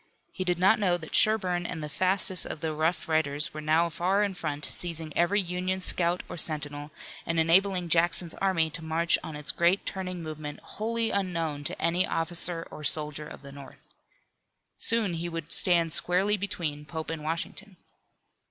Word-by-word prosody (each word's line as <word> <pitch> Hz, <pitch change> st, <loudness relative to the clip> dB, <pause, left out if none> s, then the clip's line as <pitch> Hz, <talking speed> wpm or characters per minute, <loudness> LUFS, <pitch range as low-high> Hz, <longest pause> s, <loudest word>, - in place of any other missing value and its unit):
He 185 Hz, -, -4 dB
did 180 Hz, -1 st, -1 dB
not 190 Hz, +5 st, +4 dB
know 180 Hz, -4 st, +1 dB
that 160 Hz, -2 st, -11 dB
Sherburne 185 Hz, -5 st, +2 dB
and 160 Hz, -3 st, -5 dB
the -, -, -4 dB
fastest 185 Hz, +2 st, +4 dB
of 150 Hz, -, -7 dB
the 160 Hz, -1 st, -2 dB
rough 160 Hz, +2 st, -1 dB
riders 155 Hz, -2 st, +1 dB
were 155 Hz, -, -6 dB
now 160 Hz, +3 st, +2 dB
far 185 Hz, +5 st, 0 dB
in 200 Hz, -2 st, -1 dB
front, 150 Hz, -5 st, -4 dB
seizing 165 Hz, -3 st, -4 dB
every 175 Hz, +5 st, +2 dB
Union 185 Hz, 0 st, -2 dB
scout 175 Hz, -1 st, +4 dB
or -, -, -8 dB
sentinel, 145 Hz, -2 st, -3 dB, 0.3 s
and 165 Hz, 0 st, -1 dB
enabling 180 Hz, +2 st, +3 dB
Jackson's 170 Hz, 0 st, +3 dB
army 170 Hz, -5 st, +1 dB
to 165 Hz, +2 st, -6 dB
march 165 Hz, +2 st, +2 dB
on 155 Hz, -, -7 dB
its 150 Hz, 0 st, +1 dB
great 175 Hz, +3 st, +1 dB
turning 185 Hz, -3 st, -5 dB
movement 155 Hz, -2 st, -7 dB
wholly 230 Hz, +1 st, -2 dB
unknown 165 Hz, -6 st, -2 dB
to -, -, -3 dB
any 170 Hz, +3 st, +1 dB
officer 165 Hz, 0 st, -1 dB
or 150 Hz, -, -10 dB
soldier 150 Hz, 0 st, -2 dB
of -, -, -12 dB
the 140 Hz, -, -11 dB
North. 140 Hz, -1 st, -14 dB, 0.9 s
Soon 225 Hz, -5 st, +2 dB
he 170 Hz, +1 st, -4 dB
would 165 Hz, -1 st, -4 dB
stand 170 Hz, -3 st, +3 dB
squarely 190 Hz, +5 st, +5 dB
between 170 Hz, -7 st, -4 dB
Pope 160 Hz, +1 st, -6 dB
and 160 Hz, -2 st, -6 dB
Washington. 175 Hz, +5 st, -5 dB
170 Hz, 175 wpm, -27 LUFS, 155-185 Hz, 0.9 s, squarely